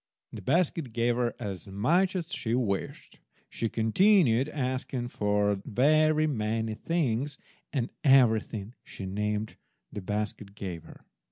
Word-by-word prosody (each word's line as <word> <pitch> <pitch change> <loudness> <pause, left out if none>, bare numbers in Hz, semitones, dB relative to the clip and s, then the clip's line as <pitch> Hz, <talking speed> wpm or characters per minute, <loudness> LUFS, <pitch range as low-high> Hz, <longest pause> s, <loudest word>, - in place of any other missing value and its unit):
The - - -7
basket 155 -3 0
gave 120 +1 +1
her 120 -1 0
as 100 -1 -6
much 170 - +2
as 175 -1 -3
she 115 0 -1
wished. 105 -6 -3 0.3
She 115 - -2
continued 135 - +3
asking 130 -3 -3
for 105 -2 +1
very 155 +5 +3
many 110 -5 -1
things, 140 -1 -1 0.3
and 125 -5 -2
everything 115 -5 +3
she 95 - -8
named 105 +2 -2 0.4
the 105 - -5
basket 105 0 -4
gave 90 -5 -6
her. - - -15
115 Hz, 125 wpm, -28 LUFS, 105-145 Hz, 0.4 s, continued